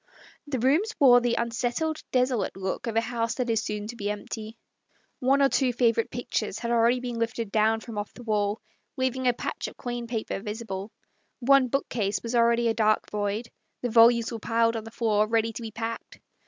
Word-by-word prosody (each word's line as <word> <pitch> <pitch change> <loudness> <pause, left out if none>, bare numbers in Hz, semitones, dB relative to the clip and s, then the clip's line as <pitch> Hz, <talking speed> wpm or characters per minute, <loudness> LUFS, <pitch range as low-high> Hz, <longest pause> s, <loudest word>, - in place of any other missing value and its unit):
The 280 -2 -2
rooms 305 - +2
wore 245 -4 +7
the 240 -1 +1
unsettled, 245 +7 -1
desolate 250 -7 +1
look 190 +4 -3
of 225 - -3
a 225 - +4
house 230 -1 -2
that 250 -2 -1
is 225 -1 +1
soon 210 -1 -4
to 240 - -6
be 205 -3 -3
empty. 215 +2 -6 0.6
One 275 +2 +3
or 275 - +5
two 265 -2 +2
favourite 230 -2 +2
pictures 235 -4 -3
had 235 0 -3
already 235 +1 +3
been 245 -2 -4
lifted 230 -2 -2
down 220 +1 +2
from 225 -3 -6
off 205 - -5
the 245 - -11
wall, 210 -1 0 0.4
leaving 260 0 0
a 245 - +4
patch - - -4
of - - -11
clean 240 -1 -4
paper 225 -4 -3
visible; 210 -1 -5 0.5
one 270 +1 +5
book 275 +3 -1
case 205 -3 -1
was 230 +1 -4
already 235 0 +3
a 225 - +2
dark 215 -1 +1
void; 210 +2 -2 0.3
the 245 - -1
volumes 235 +1 +5
were 230 - -5
piled 230 +1 +1
on 225 -1 -4
the - - -8
floor 215 -2 +1
ready 225 0 +1
to 235 - -7
be 225 - -5
packed. 225 +1 -6
230 Hz, 205 wpm, -27 LUFS, 220-245 Hz, 0.6 s, wore